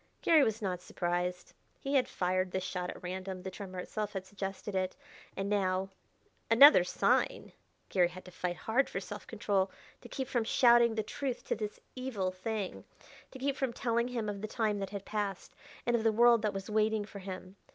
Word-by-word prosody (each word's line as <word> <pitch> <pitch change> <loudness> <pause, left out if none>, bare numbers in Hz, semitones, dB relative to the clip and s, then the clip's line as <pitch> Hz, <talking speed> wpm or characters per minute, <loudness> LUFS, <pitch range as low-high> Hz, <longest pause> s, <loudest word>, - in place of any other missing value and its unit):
Garry 320 -3 +6
was 220 -1 0
not 180 -2 -2
surprised. 180 0 -2 0.3
He 275 - -3
had 265 -3 +4
fired 185 +1 0
this 185 0 -2
shot 180 -1 -3
at - - -8
random; 185 +1 -5
the 190 - -5
tremor 185 -1 -8
itself 210 +3 -4
had 190 -2 -4
suggested 195 0 -5
it. 185 -1 -1 0.4
And 195 0 -1
now 195 -1 0 0.6
"Another 230 - +9
sign!" 180 - +1 0.4
Garry 180 -2 +4
had 180 +1 -11
to 180 - -11
fight 180 0 -3
hard 240 +9 +1
for - - -3
self 205 +2 -8
control 200 -3 0 0.3
to - - -12
keep 265 -2 -3
from 245 -3 0
shouting 235 0 +5
the 220 - 0
truth 260 +2 -4
to - - +2
this 210 -1 -5 0.2
evil 240 -8 -2
thing 195 +1 -4 0.5
to - - -10
keep 275 +1 -1
from 265 -4 -1
telling 235 0 0
him 235 -3 -3
of 200 -1 -4
the 215 - -3
time 215 -2 0
that 195 -1 -3
had 200 -1 -6
passed, 205 -3 -3 0.3
and 240 - +2
of 225 - 0
the 225 - +4
world 235 +1 +6
that 210 -1 +1
was 195 -1 -5
waiting 215 -1 +1
for 200 - -9
him. 185 0 -8
205 Hz, 200 wpm, -32 LUFS, 185-230 Hz, 0.6 s, Another